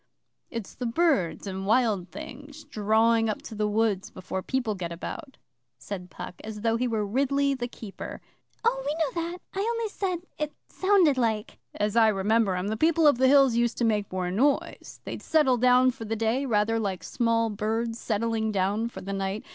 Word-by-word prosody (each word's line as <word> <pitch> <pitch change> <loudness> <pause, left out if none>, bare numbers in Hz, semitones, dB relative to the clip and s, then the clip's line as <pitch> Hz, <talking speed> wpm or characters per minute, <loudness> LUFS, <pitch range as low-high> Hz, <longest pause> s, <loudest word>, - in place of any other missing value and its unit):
'It's 230 -4 -6
the 250 - -4
birds 230 - +1
and 190 0 -4
wild 215 -6 +2
things 285 - -9
drawing 225 -2 +2
up 215 - -2
to - - -10
the 210 0 0
woods 210 -2 0
before 185 0 -5
people 245 -1 -1
get 175 -4 -5
about,' 270 - -7 0.4
said 180 +3 -7
Puck, - - -8
as 215 -1 -7
though 225 0 +2
he 250 +2 0
were 220 -3 -1
Ridley 275 +5 +1
the 240 -2 -3
keeper. 220 -4 -8 0.4
'Oh, 270 -13 +1
we 290 +2 -1
know 330 +1 -1
that. 355 - -7 0.2
I 390 - -3
only 460 +1 -1
said 365 -4 -3 0.2
it 300 -1 -2 0.2
sounded 375 -8 +3
like.' 220 -3 -1 0.2
'As 210 +1 -1
I 230 -1 +6
remember 210 0 +2
'em, 180 +3 -2
the 220 - -2
People 320 +4 +3
of 285 -5 +5
the 260 - +5
Hills 275 -2 +6
used 235 0 +1
to 240 - +1
make 210 -3 0
more 185 -1 -2
noise. 275 +9 0
They'd - - -6
settle 295 -6 +3
down 250 +1 +5
for 245 -2 -9
the 225 +1 -2
day 225 +5 0
rather 225 0 +2
like 195 -4 -3
small 230 -2 +1
birds 225 +2 -2
settling 220 0 -1
down 205 +4 0
for - - -9
the 200 +1 -5
night. 195 +2 -3
230 Hz, 195 wpm, -27 LUFS, 210-270 Hz, 0.4 s, I